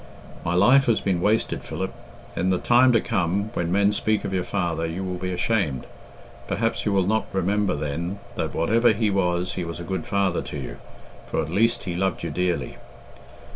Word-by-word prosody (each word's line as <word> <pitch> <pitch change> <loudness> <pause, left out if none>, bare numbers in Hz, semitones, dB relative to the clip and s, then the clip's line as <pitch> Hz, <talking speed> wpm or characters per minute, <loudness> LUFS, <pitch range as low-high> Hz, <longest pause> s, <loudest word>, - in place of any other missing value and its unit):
My 85 - 0
life 125 +9 +6
has 115 -3 +3
been 90 -3 0
wasted, 110 +4 +1
Philip. - - -4 0.4
In 90 +2 0
the 95 - +2
time 125 +5 +5
to 115 - +5
come, 100 0 -1
when 85 -1 -1
men 100 +2 +3
speak 110 +1 0
of 95 - -3
your 90 -1 0
father, 85 -5 -1
you 85 +4 -4
will 90 -1 -4
be 95 0 -3
ashamed. 90 - 0 0.6
Perhaps 115 0 -1
you - - +2
will 95 -2 +2
not 110 +3 +1
remember 100 +1 +1
then 80 +6 -3 0.2
that - - -3
whatever 115 +6 +3
he 105 0 +1
was 90 -2 0
he 90 - -3
was 85 0 -6
a - - -5
good 95 +2 -4
father 100 -3 +1
to - - -6
you, 70 - -6 0.5
for - - -2
at 80 - -2
least 115 +5 +2
he 90 -3 -3
loved 95 0 -1
you - - -3
dearly. 90 -1 -1
95 Hz, 200 wpm, -24 LUFS, 85-105 Hz, 0.6 s, life